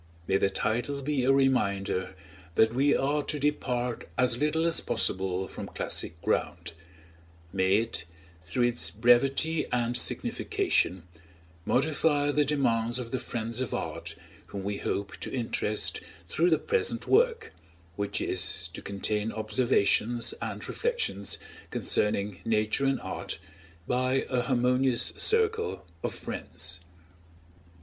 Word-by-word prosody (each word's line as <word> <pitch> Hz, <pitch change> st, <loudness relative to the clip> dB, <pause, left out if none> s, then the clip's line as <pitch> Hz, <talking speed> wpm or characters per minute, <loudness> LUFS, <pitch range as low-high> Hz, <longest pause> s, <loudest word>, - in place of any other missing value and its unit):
May 95 Hz, -, +3 dB
the 95 Hz, -, +2 dB
title 120 Hz, +8 st, -1 dB
be 140 Hz, -2 st, 0 dB
a 135 Hz, -, +5 dB
reminder 100 Hz, -9 st, +1 dB, 0.4 s
that 110 Hz, +4 st, +4 dB
we 140 Hz, +3 st, +4 dB
are 145 Hz, +2 st, +1 dB
to 150 Hz, -, -3 dB
depart 125 Hz, -4 st, -1 dB
as 125 Hz, -1 st, +3 dB
little 150 Hz, +5 st, +1 dB
as 165 Hz, -1 st, +2 dB
possible 95 Hz, 0 st, 0 dB
from -, -, -7 dB
classic 80 Hz, -, -3 dB
ground; -, -, -1 dB, 0.8 s
may 95 Hz, 0 st, +3 dB
it, 110 Hz, -6 st, -1 dB, 0.4 s
through 85 Hz, +9 st, -1 dB
its 85 Hz, -9 st, +1 dB
brevity 135 Hz, -, +3 dB
and 120 Hz, 0 st, +1 dB
signification, 95 Hz, -6 st, +1 dB, 0.6 s
modify 145 Hz, +1 st, +2 dB
the 150 Hz, +1 st, +3 dB
demands 120 Hz, -5 st, +1 dB
of 120 Hz, -2 st, -5 dB
the 130 Hz, -, -1 dB
friends 115 Hz, +1 st, -3 dB
of 130 Hz, -, -2 dB
art -, -, -5 dB, 0.3 s
whom 100 Hz, -1 st, -6 dB
we 100 Hz, 0 st, -2 dB
hope 100 Hz, 0 st, -3 dB
to -, -, -5 dB
interest 115 Hz, -4 st, -1 dB, 0.3 s
through 170 Hz, -, +2 dB
the 160 Hz, -, +4 dB
present 470 Hz, 0 st, 0 dB
work, 470 Hz, +1 st, +3 dB, 0.4 s
which 100 Hz, +1 st, -2 dB
is -, -, -1 dB
to -, -, -8 dB
contain 105 Hz, +2 st, -2 dB
observations 115 Hz, +1 st, +1 dB
and -, -, -4 dB
reflections 480 Hz, 0 st, -1 dB, 0.3 s
concerning 100 Hz, -2 st, 0 dB
Nature 110 Hz, +4 st, +1 dB
and 135 Hz, -, +1 dB
Art -, -, -5 dB, 0.5 s
by 130 Hz, +1 st, +1 dB
a 125 Hz, -1 st, +2 dB
harmonious 125 Hz, 0 st, +2 dB
circle 450 Hz, -, +1 dB, 0.2 s
of -, -, -3 dB
friends. 85 Hz, +1 st, -5 dB
120 Hz, 125 wpm, -29 LUFS, 105-140 Hz, 0.8 s, a